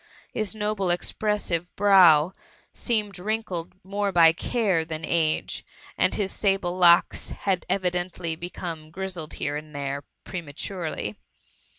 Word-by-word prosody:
His 215 -1 -2
noble 210 -3 -1
expressive 175 -1 0
brow 185 -5 +6 0.4
seemed 210 -5 -1
wrinkled 190 -4 -3
more 200 +1 -1
by 165 -3 +7
care 195 -3 0
than 160 0 -5
age, 160 -2 0 0.3
and - - +2
his 200 -2 -1
sable 195 -3 0
locks 175 -1 +4
had 190 -3 -2
evi 185 -1 +1
dently 175 -2 -3
become 170 -2 -5
^' 155 - -18
grizzled 180 -3 -5
here 145 +1 -2
and 150 0 -7
there,'^ 140 0 -3 0.2
pre 185 - -5
maturely. 155 - -4
180 Hz, 130 wpm, -25 LUFS, 160-195 Hz, 0.4 s, by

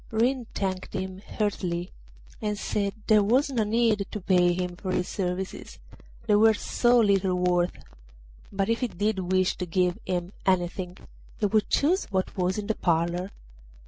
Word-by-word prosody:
Ring 240 +2 +1
thanked 190 -2 -3
him 190 0 -4 0.2
heartily, 180 -4 -1 0.5
and 210 -1 -1
said 200 -1 -1
there 215 -1 +5
was 255 +8 +2
no 235 -4 +1
need 215 -2 +1
to 210 - -5
pay 180 -2 +3
him 180 0 -2
for 185 +1 -4
his 180 - 0
services, 185 0 -4 0.5
they 215 - +2
were 220 +1 +5
so 240 +3 +2
little 195 -4 +3
worth; 180 -1 +1 0.7
but 195 0 -1
if 230 0 +1
he 250 - 0
did 195 -3 -2
wish 185 -1 +2
to 180 - -4
give 180 +3 +1
him 180 -1 -2
anything 180 0 0 0.4
he 215 - 0
would 210 +1 +1
choose 345 +7 +2
what 190 -2 -2
was 185 0 0
in 210 - -3
the 220 - 0
parlour. 175 +1 0
190 Hz, 165 wpm, -26 LUFS, 180-215 Hz, 0.7 s, there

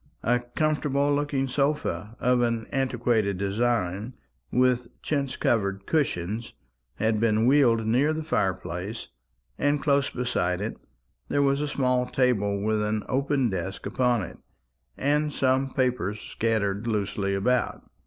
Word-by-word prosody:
A 120 +1 +3
comfortable 145 +2 0
looking 145 -2 0
sofa, 140 -5 -1
of 125 0 +2
an 115 -2 0
antiquated 120 -7 +1
design, 105 +1 -1 0.4
with 125 -1 +2 0.2
chintz 140 -3 -1
covered 100 -4 0
cushions, 110 - -1 0.4
had 110 -1 +1
been 110 0 +2
wheeled 120 -4 +4
near 130 +7 +3
the 155 0 -3
fire 95 - +1
place; 90 +7 -6 0.5
and 145 +1 +2
close 140 -1 +2
beside 120 -8 -1
it 105 +3 -3 0.5
there 145 - +2
was 140 +1 +2
a 150 - -1
small 125 -3 +1
table 105 -6 +1
with 110 0 +1
an 105 0 -1
open 135 -2 +1
desk 95 +1 -4
upon 125 -4 +1
it, 85 - -9 0.6
and 150 +2 +1
some 135 0 +1
papers 125 -7 -1
scattered 110 -2 -1
loosely 100 -2 -1
about. 125 +6 0
120 Hz, 135 wpm, -26 LUFS, 105-135 Hz, 0.6 s, wheeled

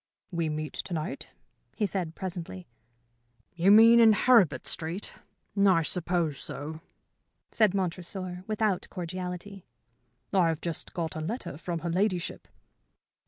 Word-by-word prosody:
"We 170 -2 -1
meet 155 0 -4
to 180 - -4
night?" 155 -1 -5 0.4
he 215 - +1
said, 180 -5 -3
presently. 170 - -6 0.9
"You 175 +2 +2
mean 225 +3 +8
in 225 -2 +7
Heribert 225 - +4
Street? 165 +5 -5 0.5
I 185 -4 +5
suppose 170 -3 -1
so," 155 +3 -6 0.7
said 215 -4 +3
Montresor, 180 0 -3
without 215 -3 0
cordiality. 180 +2 -6 0.7
"I 185 -3 +4
have 160 -2 -1
just 170 -2 -3
got 165 -2 -3
a 155 - -3
letter 215 - -4
from 170 +1 -4
her 170 - -2
ladyship." 185 -1 -1
180 Hz, 125 wpm, -28 LUFS, 165-195 Hz, 0.9 s, mean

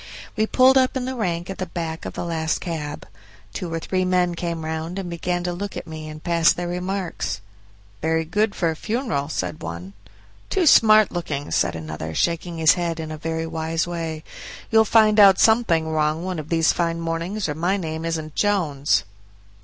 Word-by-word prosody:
We 220 -1 +1
pulled 260 +2 +5
up 260 0 +1
in 250 - -3
the 260 - -3
rank 175 -7 -2
at 195 - -8
the 185 - -3
back 165 -1 -5
of - - -5
the - - -4
last 160 -1 -1
cab. 155 -4 -5 0.5
Two 175 -3 -5
or 165 - -1
three 185 +3 -1
men 180 -1 +2
came 170 -2 -4
round 160 +3 -4
and 185 -3 -4
began 175 +1 -2
to 175 0 -2
look 200 +3 -5
at - - -6
me 155 -1 -7
and 155 0 -10
pass 170 -2 +4
their 175 0 -3
remarks. 180 +1 -3 0.6
"Very 160 0 +1
good 210 +5 0
for 170 -3 +1
a - - -5
funeral," 210 - -2
said 155 - -3
one. 85 +3 -7 0.6
"Too 375 -3 +1
smart 215 - +6
looking," 145 -5 -4
said 85 - +1
another, 80 0 -6
shaking 170 - -1
his 160 -1 +6
head 170 -2 -2
in 160 -1 -5
a 155 - -5
very 160 +1 -2
wise 165 0 -2
way; 165 -2 -4 0.5
"you'll 220 0 +5
find 215 -1 +5
out 195 -2 +8
something 220 -9 +3
wrong 155 +1 0
one 185 -2 -3
of 155 - -8
these 165 -1 +3
fine 170 -1 -1
mornings, 165 +5 -2
or 150 - -2
my 175 +6 0
name 160 -3 -4
isn't 160 -2 -3
Jones." 160 -9 +1
170 Hz, 195 wpm, -23 LUFS, 160-185 Hz, 0.6 s, out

